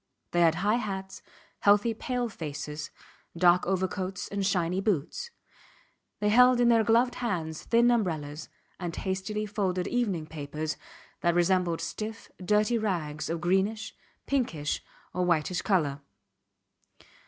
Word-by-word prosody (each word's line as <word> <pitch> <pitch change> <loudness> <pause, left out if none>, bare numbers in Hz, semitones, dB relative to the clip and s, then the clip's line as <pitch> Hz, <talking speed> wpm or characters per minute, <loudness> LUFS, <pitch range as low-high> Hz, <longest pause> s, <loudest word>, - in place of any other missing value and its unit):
They 175 - +2
had 165 -1 +5
high 205 +6 +2
hats, 190 -3 -5 0.4
healthy 205 +3 +4
pale 245 +2 -2
faces, 150 -5 -6 0.5
dark 175 +1 +4
overcoats 190 0 -2
and 200 0 -2
shiny 180 -1 +1
boots; 200 - -1 0.9
they 210 - +2
held 250 +3 +6
in 240 -1 +5
their 230 -1 +5
gloved 235 +3 +3
hands 165 -9 -2
thin 235 +1 +4
umbrellas 155 -9 -1 0.3
and 175 -3 -4
hastily 195 +3 -2
folded 190 -4 -1
evening 205 -10 0
papers 155 0 -4 0.4
that 170 0 +2
resembled 175 -1 +2
stiff, 220 +1 -5
dirty 210 +4 +2
rags 165 -8 -2
of 165 0 -2
greenish, 195 +5 0 0.3
pinkish, 170 - -1 0.3
or 180 - 0
whitish 175 0 +1
colour. 150 -9 +1
190 Hz, 125 wpm, -28 LUFS, 165-215 Hz, 0.9 s, held